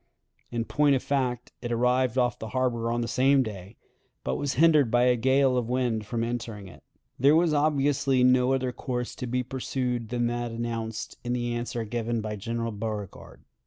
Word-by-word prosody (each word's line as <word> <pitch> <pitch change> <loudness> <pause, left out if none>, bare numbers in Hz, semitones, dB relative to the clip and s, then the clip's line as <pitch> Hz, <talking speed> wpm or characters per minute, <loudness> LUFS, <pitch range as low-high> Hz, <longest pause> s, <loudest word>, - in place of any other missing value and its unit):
(In 115 -1 -2
point 145 +1 +3
of 130 - -2
fact, 125 -3 -1
it 120 -1 -4
arrived 125 +1 +2
off 125 -1 +1
the 110 - -5
harbor 120 -3 0
on 120 0 0
the 115 - -2
same 135 +3 +3
day, 100 -2 -8 0.5
but 65 - -1
was 145 - -2
hindered 150 -3 +5
by 120 +2 +3
a 125 0 +4
gale 130 +2 +3
of 120 -2 -1
wind 120 -4 0
from 115 0 -2
entering 115 -4 -4
it.) - - -14 0.4
There 140 +4 +5
was 165 -1 +3
obviously 145 -3 +2
no 125 +1 +4
other 130 -1 0
course 125 0 -4
to 125 - -4
be 125 +1 -1
pursued 125 -2 -3
than 120 -1 0
that 120 0 -2
announced 115 -1 -4
in 120 0 -2
the 120 -1 -1
answer 120 0 -3
given 115 +1 -2
by 110 -1 -4
General 115 +2 -3
Beauregard. 105 -2 -6
120 Hz, 190 wpm, -27 LUFS, 115-130 Hz, 0.5 s, hindered